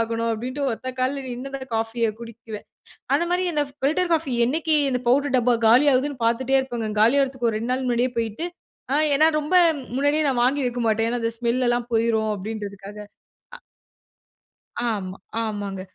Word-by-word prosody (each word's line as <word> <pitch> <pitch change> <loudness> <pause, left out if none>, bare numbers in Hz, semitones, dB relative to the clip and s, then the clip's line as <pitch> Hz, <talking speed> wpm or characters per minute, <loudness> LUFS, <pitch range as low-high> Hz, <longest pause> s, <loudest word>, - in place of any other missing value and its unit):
ஆகணும்." 230 0 -1
அப்படின்ட்டு 255 +6 -3
ஒத்த 255 +3 -6
கால்ல 270 +1 -1
நின்னுதான் 270 +3 -6
இந்த 260 - -24
காஃபியை 225 0 0
குடிப்பேன். 230 -2 -9 0.5
அந்த 335 - +1
மாதிரி 365 +1 +1
அந்த 295 - +2 0.2
பில்டர் 340 +5 +1
காஃபி, 315 -5 0 0.2
என்னைக்கு 315 +4 0 0.2
இந்த 250 - 0
பவுடர் 275 +1 +2
டப்பா 245 0 +3
காலி 245 +6 +6
ஆகுதுன்னு 275 +1 0
பார்த்துட்டே 255 +3 +1
இருப்பேங்க. 240 -4 -3
காலியாகறதுக்கு 260 +1 +2
ஒரு 215 - -2
2 235 +3 -3
நாள் 260 0 -2
முன்னாடியே 245 +1 +1
போய்ட்டு, 230 +8 -2 0.5
ஆ - - +3 0.2
ஏன்னா 310 +3 +5
ரொம்ப 300 +5 -4 0.4
முன்னாடியே 290 +3 +2
நான் 245 -2 +1
வாங்கி 275 +2 +1
வைக்க 245 0 -2
மாட்டேன். 225 +1 +1
ஏன்னா, 245 - -1
அந்த 230 - 0
ஸ்மெல் 245 +1 0
எல்லாம் 240 0 -1
போய்ரும் 225 -1 +1
அப்படின்றதுக்காக. 205 0 -7 0.6
அ. - - -12 1.3
ஆமா, 190 -4 -3 0.3
ஆமாங்க. 205 -3 -4
245 Hz, 165 wpm, -23 LUFS, 225-275 Hz, 1.3 s, காலி